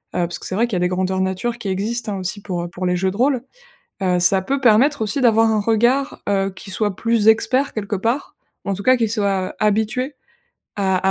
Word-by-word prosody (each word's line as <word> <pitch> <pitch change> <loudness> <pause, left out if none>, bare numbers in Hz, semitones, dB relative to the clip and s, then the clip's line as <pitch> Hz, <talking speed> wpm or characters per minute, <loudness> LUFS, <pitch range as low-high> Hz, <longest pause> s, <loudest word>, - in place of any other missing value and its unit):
heu, - - 0
parce 175 - -4
que - - -9
c'est 185 - -3
vrai 230 +4 +2
qu'il 225 - -3
y - - +1
a - - 0
des 180 - +2
grandeur 185 +1 -1
nature 190 +6 -2
qui 225 -5 -5
existent, 210 +3 -2
hein, - - -4
aussi 190 +2 -4
pour, 180 -4 -4
heu, - - -4
pour 180 +2 -5
les 180 0 +1
jeux 190 +1 0
de - - -9
rôle. 255 0 +1 0.6
Heu, 180 -1 +2
ça 190 +2 +3
peut 275 +7 -1
permettre 255 +4 +4
aussi 220 +6 -1
d'avoir 225 -2 +4
un 215 -1 +1
regard, 240 +6 +1
heu, 195 -1 +1
qui 195 +1 -10
soit 205 0 -1
plus 230 -2 +1
expert, 255 +5 +3
quelque 205 -1 -3
part, 255 - -2 0.3
en 200 - -1
tout 200 - -6
cas 255 +4 +5
qui 230 -2 0
soit 200 -4 -1
habitué 220 +6 0 0.6
à 190 -2 +1
210 Hz, 240 wpm, -20 LUFS, 190-235 Hz, 0.6 s, cas